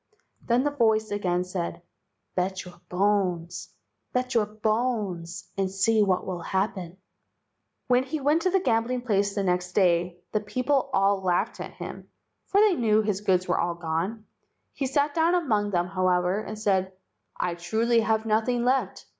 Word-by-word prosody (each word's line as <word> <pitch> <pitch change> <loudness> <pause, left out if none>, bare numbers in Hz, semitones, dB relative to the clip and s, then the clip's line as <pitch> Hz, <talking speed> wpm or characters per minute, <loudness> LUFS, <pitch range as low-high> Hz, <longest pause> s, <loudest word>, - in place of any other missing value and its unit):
Then 240 +2 +2
the 290 - +1
voice 220 -6 +2
again 180 -3 0
said, 175 -1 -4 0.5
"Bet 185 +1 -2
your 180 -1 -13
bones, 180 -3 0 0.4
bet 250 +1 -1
your 220 -3 +2
bones, 210 -5 -2
and 190 -1 +1
see 205 +3 +2
what 190 -3 +1
will 180 -2 -4
happen." 190 -1 -2 0.9
When 250 0 +3
he 280 +4 -4
went 295 +4 +2
to 370 - +2
the 385 +1 +3
gambling 245 -4 0
place 200 -4 +1
the 200 - 0
next 180 -1 -1
day 175 -2 +2
the 215 - +1
people 255 +6 0
all 195 -4 +2
laughed 180 -2 0
at - - -6
him, - - -8 0.4
for 395 - +3
they 425 -2 +5
knew 220 -7 +2
his 205 -2 -1
goods 185 -3 +1
were - - +1
all 170 0 0
gone. 170 +7 -3 0.5
He 270 - -2
sat 285 +2 +1
down 335 +2 +3
among 215 -12 +1
them, 175 -3 +1
however, 185 0 +1
and 215 0 -7
said: 190 -3 0 0.4
"I 175 - -1
truly 220 +7 +1
have 220 0 +1
nothing 225 +3 +1
left. 260 +2 0
205 Hz, 165 wpm, -26 LUFS, 180-240 Hz, 0.9 s, they